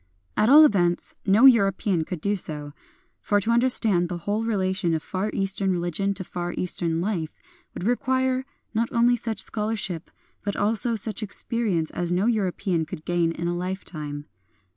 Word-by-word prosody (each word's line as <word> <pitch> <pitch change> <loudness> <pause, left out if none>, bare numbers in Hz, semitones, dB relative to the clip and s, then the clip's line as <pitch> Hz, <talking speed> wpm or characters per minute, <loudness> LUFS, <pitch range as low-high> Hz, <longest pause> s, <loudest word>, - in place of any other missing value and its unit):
At 215 - +3
all 305 +3 +9
events, 175 -8 +1
no 210 +7 +5
European, 195 -7 +4
could 175 -2 -6
do 205 +3 +1
so; 150 -5 -5 0.5
for 205 - +2
to 220 +4 0
understand 225 -7 +3
the 175 - -3
whole 205 +6 -2
relation 190 -5 0
of 155 - -3
Far 190 +3 -3
Eastern 195 0 0
religion 180 +3 -1
to 190 - -5
Far 175 -1 -5
Eastern 170 -2 0
life 175 -5 -3 0.4
would - - -5
require, 260 +3 +1 0.3
not 230 +1 0
only 240 +1 +3
such 225 -3 -4
scholarship, 210 -6 -2 0.3
but 200 -1 -2
also 225 +3 +1
such 215 0 -2
experience 205 -5 -2
as 175 0 -3
no 180 +3 +1
European 195 -6 0
could 155 0 -8
gain 175 -1 +1
in 170 +1 -4
a 175 - -1
lifetime. 155 -5 -5
195 Hz, 165 wpm, -24 LUFS, 175-220 Hz, 0.5 s, all